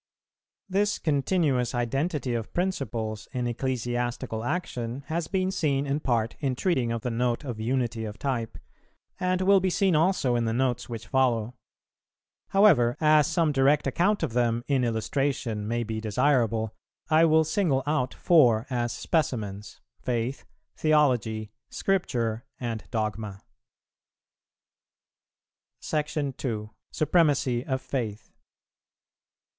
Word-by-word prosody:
This 205 +2 +1
continuous 140 -5 +1
identity 135 +3 -1
of 115 -2 -3
principles 120 - -2
in 125 -1 -1
ecclesiastical 120 -1 -2
action 130 -5 -3
has 165 0 -1
been 190 -1 0
seen 145 -7 0
in 140 +1 -1
part 115 -5 0
in 135 -4 -1
treating 130 -7 0
of 115 -1 -3
the 125 - -1
Note 120 +3 0
of 120 -6 -5
Unity 120 -1 -1
of 105 0 -7
type, 120 -5 -3 0.6
and 185 0 0
will 195 +1 +5
be 185 0 0
seen 185 -1 +2
also 155 -6 +2
in 120 -1 +1
the 115 - 0
Notes 125 0 0
which 115 -2 -6
follow; 125 -4 +1 1.0
however, 155 - +4
as 155 -1 +5
some 165 -4 +2
direct 140 +1 +3
account 180 +9 +1
of - - -2
them, 120 -1 +1
in 135 -3 +2
illustration, 115 -1 -1
may 120 +1 -1
be 110 -1 -4
desirable, 115 -2 +1 0.4
I 160 +1 +6
will 160 0 +5
single 155 -5 +1
out 145 -4 0
four 125 -10 +4
as 120 -1 0
specimens, 110 - -2 0.2
Faith, 120 +2 -2 0.3
Theology, 120 -9 +2 0.2
Scripture, 120 - -1 0.2
and 115 -3 -4
Dogma. 105 -2 -3 2.4
§ 150 -3 -2
2. 110 -5 -3 0.2
_Supremacy 145 -7 +2
of 130 -1 -2
Faith. 110 -6 -4
125 Hz, 125 wpm, -27 LUFS, 115-155 Hz, 2.4 s, I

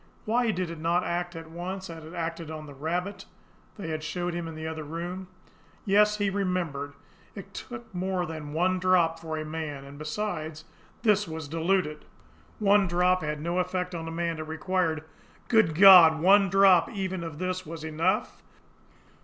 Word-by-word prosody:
Why 235 +2 +1
did 185 -4 -2
it 165 - -8
not 170 +3 +1
act 175 0 -3
at 165 0 -9
once, 185 +3 -5
as 165 -1 -8
it 155 - -12
had 160 - -11
acted 165 -1 -4
on 155 -1 -7
the 145 - -11
rabbit 175 +8 -3 0.5
they 195 -6 -6
had 155 -1 -3
showed 175 +2 -3
him 170 -1 -4
in 160 - -7
the 160 0 -6
other 160 0 -4
room? 175 +5 -6 0.6
Yes, 210 +1 +4
he 205 -2 0
remembered! 180 -8 -2 0.4
It - - -10
took 230 -3 -9
more 185 0 -1
than 155 -2 -7
one 180 +4 +1
drop 175 -3 +3
for 160 -1 -5
a 155 - -4
man; 155 -3 -5
and 140 +1 -11
besides, 155 -1 -4 0.4
this 210 -3 +3
was 160 -2 -6
diluted. 165 0 0 0.5
One 205 -1 +4
drop 180 +1 +2
had 150 -1 -3
no 170 +3 -1
effect 180 0 -2
on 165 -1 -5
a - - -5
man; 165 -1 -2
it 155 - -5
required 160 0 -1 0.5
Good 220 -9 +4
God, 175 -3 +9
ONE 195 +3 +5
DROP 195 -3 +5
EVEN 190 -4 -3
OF 165 -3 -7
THIS 185 +1 -2
WAS 165 0 -7
ENOUGH? 165 +6 -1
170 Hz, 180 wpm, -27 LUFS, 160-185 Hz, 0.6 s, God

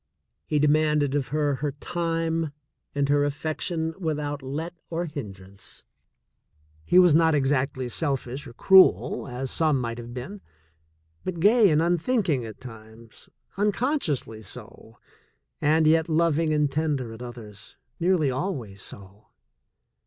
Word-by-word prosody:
He 150 - +1
demanded 150 -1 +2
of 145 -2 0
her 145 -2 0
her 145 +1 -2
time 165 0 -2 0.4
and 140 -1 +1
her 145 0 +3
affection 160 +3 -2
without 150 -4 -2
let 150 +6 -5 0.2
or 170 +1 -2
hindrance. 100 - -8 1.0
He 180 - +4
was 180 -3 +7
not 160 0 +4
exactly 135 -2 0
selfish 135 0 -2
or 120 - -11
cruel, 130 - +5
as 130 +1 -4
some 155 -4 +2
might 120 -1 -4
have 120 0 -8
been, 130 +12 -7 0.8
but 180 -2 -4
gay 210 +3 +5
and 155 0 +3
unthinking 175 - +1
at 110 -2 -9
times, 115 -2 -13 0.3
unconsciously 205 - -1
so, 105 - -10 0.6
and 155 +2 +3
yet 160 +1 +3
loving 165 0 +2
and 150 -2 +1
tender 140 -6 -1
at 110 - -11
others 115 -4 -10
— - - -45
nearly 170 -5 +2
always 125 - -4
so. 100 +2 -8
145 Hz, 130 wpm, -25 LUFS, 125-165 Hz, 1.0 s, was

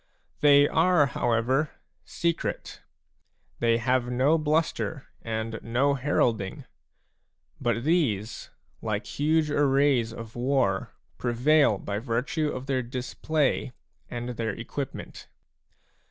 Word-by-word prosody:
They 145 -1 +6
are, 165 -1 +4
however, 130 +3 +1 0.4
secret; 170 -1 -3 0.8
they 115 -1 +3
have 125 +1 +1
no 130 +6 +3
bluster 155 -1 -1 0.2
and 115 0 -3
no 130 +5 +1
heralding; 120 -7 0 1.0
but 120 -1 0
these, 125 - 0 0.3
like 105 -1 -2
huge 155 +5 +1
arrays 140 -4 +3
of 115 -1 -9
war, 125 -6 +1 0.3
prevail 125 0 +3
by 100 +1 -4
virtue 125 +7 -1
of 130 -1 -5
their 135 -2 0
display 130 +3 -1 0.4
and 120 0 -5
their 115 -2 -3
equipment. 130 +4 -6
130 Hz, 100 wpm, -27 LUFS, 115-145 Hz, 1.0 s, They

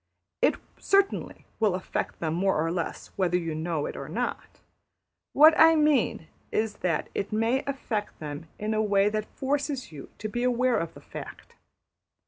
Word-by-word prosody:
It - - +4 0.2
certainly 395 0 +1
will 210 -5 +3
affect 185 - -4
them 160 -2 -1
more 190 0 +1
or 165 - -1
less 170 -1 -4
whether 180 -2 +2
you 165 -2 -3
know 160 -1 -2
it - - -5
or - - -7
not. - - -4 0.7
What 310 +3 +8
I 325 0 +8
mean 295 - +2 0.2
is 215 -1 -1
that 170 -4 -1
it 200 - -3
may 225 +4 +1
affect 235 -7 -3
them 150 +1 -7
in 215 +1 -2
a 215 - +2
way 205 -1 +3
that 215 0 -2
forces 275 - -2
you 145 -3 -10
to 215 - -4
be 240 +3 -3
aware 250 0 +2
of 165 -1 -5
the - - -12
fact. - - -10
210 Hz, 170 wpm, -27 LUFS, 170-255 Hz, 0.7 s, What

